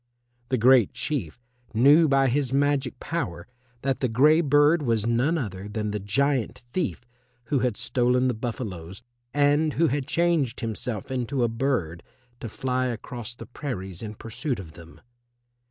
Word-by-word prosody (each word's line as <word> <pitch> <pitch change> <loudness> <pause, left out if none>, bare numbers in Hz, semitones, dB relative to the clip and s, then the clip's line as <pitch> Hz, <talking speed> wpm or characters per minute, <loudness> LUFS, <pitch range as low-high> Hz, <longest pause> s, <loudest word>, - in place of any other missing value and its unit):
The 130 - +1
Great 125 -2 +5
Chief 120 - -3 0.4
knew 145 +8 +6
by 135 -1 +3
his 130 0 0
magic 140 -2 +1
power 170 +1 -4 0.4
that 135 -1 0
the 130 - +1
grey 150 +8 +5
bird 145 +2 +4
was 115 -5 0
none 125 +8 +2
other 100 - -5
than 105 0 -3
the 105 - -2
giant 125 +5 0
thief 175 -9 -1 0.5
who 140 - +2
had 125 -4 0
stolen 125 +1 +1
the 125 - +1
buffaloes, 100 -7 -6 0.3
and 145 +2 +2
who 165 -1 +2
had 140 0 -2
changed 160 -7 +1
himself 115 0 -4
into 130 0 -1
a - - +3
bird 115 - -1 0.4
to 120 -5 -6
fly 130 +3 -1
across 120 -1 -6
the - - -9
prairies 95 - -6
in 110 -1 -6
pursuit 120 +5 -4
of 90 -5 -9
them. 85 0 -14
125 Hz, 155 wpm, -25 LUFS, 110-145 Hz, 0.5 s, knew